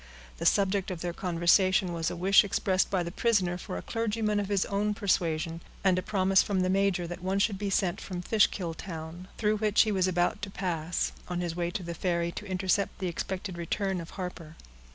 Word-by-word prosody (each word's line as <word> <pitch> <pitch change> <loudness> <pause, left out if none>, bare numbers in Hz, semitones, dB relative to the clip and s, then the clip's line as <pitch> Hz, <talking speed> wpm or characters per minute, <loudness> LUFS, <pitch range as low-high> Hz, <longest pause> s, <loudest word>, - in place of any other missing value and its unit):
The - - +2
subject 195 -1 +2
of 180 -3 -5
their 175 -1 -2
conversation 180 +1 +2
was 165 0 -1
a - - -5
wish 190 +4 +5
expressed 190 -1 +1
by 185 -3 +1
the 170 - -5
prisoner 195 -4 +1
for 175 - -6
a 90 - -6
clergyman 220 -2 -1
of 200 - -2
his 200 -2 +2
own 205 +1 0
persuasion, 165 -5 0 0.2
and 185 -2 +4
a - - -2
promise 190 -1 +3
from 195 -2 0
the 185 0 +1
major, 195 -2 +1
that 175 +1 -7
one 190 +2 -1
should 200 -1 +1
be 205 -1 -2
sent 185 -2 0
from 180 -2 -5
Fishkill 190 -5 +2
town, 165 +1 -8
through 215 -1 +1
which 210 0 +4
he 220 - -1
was 190 -2 +2
about 180 +4 +1
to 200 - -4
pass, 175 -3 -2 0.2
on 180 -1 -3
his 170 -2 -3
way 175 -1 -1
to 180 +1 -4
the 170 0 -5
ferry 170 0 -1
to 210 - -7
intercept 190 +1 0
the 185 - -3
expected 185 +1 -4
return 190 +2 -1
of 165 - -9
Harper. 180 -4 -6
185 Hz, 215 wpm, -29 LUFS, 175-200 Hz, 0.2 s, wish